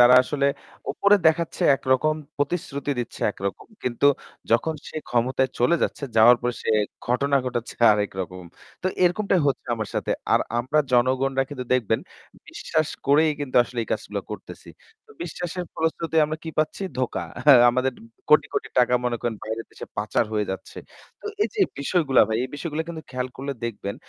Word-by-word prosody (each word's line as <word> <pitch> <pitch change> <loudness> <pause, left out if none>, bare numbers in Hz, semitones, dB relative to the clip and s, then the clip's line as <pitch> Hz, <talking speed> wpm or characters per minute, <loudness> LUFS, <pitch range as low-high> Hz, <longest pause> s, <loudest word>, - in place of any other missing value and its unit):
তারা 125 +1 +8
আসলে 140 +1 0 0.5
উপরে 205 +1 +4
দেখাচ্ছে 160 +1 +1
একরকম, 135 +4 +1 0.2
প্রতিশ্রুতি 145 -1 -2
দিচ্ছে 120 - -5
একরকম। 100 -1 -5 0.2
কিন্তু 125 +3 +1 0.4
যখন 120 +8 +2
সে - - -9
ক্ষমতায় 130 +2 +1
চলে 125 +7 +4
যাচ্ছে, - - -1
যাওয়ার 115 +2 +8
পরে 120 0 -1
সে - - -1 0.4
ঘটনা 140 +3 +2
ঘটাচ্ছে 120 -2 -3 0.2
আরেক 105 -1 0
রকম। 90 0 -6 0.4
তো - - 0 0.2
এরকমটাই 185 +1 +2
হচ্ছে 135 -3 -1
আমাদের 110 -2 -5
সাথে। - - -2 0.2
আর - - +5 0.2
আমরা 130 +6 0
জনগণরা 130 +2 +2
কিন্তু 130 -3 -5
দেখবেন, 115 -3 +1 0.5
বিশ্বাস 155 -1 -1 0.2
করেই 155 +3 +5
কিন্তু 140 -3 -3
আসলে 120 0 -8
এই - - -9
কাজগুলা - - -3
করতেছি। - - -9 0.5
বিশ্বাসের 180 - -4
ফলশ্রুতিতে 160 0 -2
আমরা 155 +1 -3
কী 160 - -4
পাচ্ছি? 155 +5 0 0.2
ধোঁকা। 130 -2 -1 0.5
আমাদের 130 +2 +1 0.4
কোটি 150 - +6
কোটি - - -1
টাকা, 125 0 +4
মনে 120 -1 0
করেন, 120 -1 -2
বাইরের 110 +1 -5
দেশে - - -9
পাচার 105 +3 +1
হয়ে 105 -1 +1
যাচ্ছে। 95 - -7 0.4
তো - - -7 0.2
এই - - +1
যে 425 - -2 0.2
বিষয়গুলা 140 -2 +3
ভাই, 110 - 0
এই - - -5
বিষয়গুলা 155 +1 -3
কিন্তু 160 -2 -6
খেয়াল 125 0 -3
করলে 140 +1 -4
দেখবেন 105 -3 -4
130 Hz, 165 wpm, -24 LUFS, 120-155 Hz, 0.5 s, তারা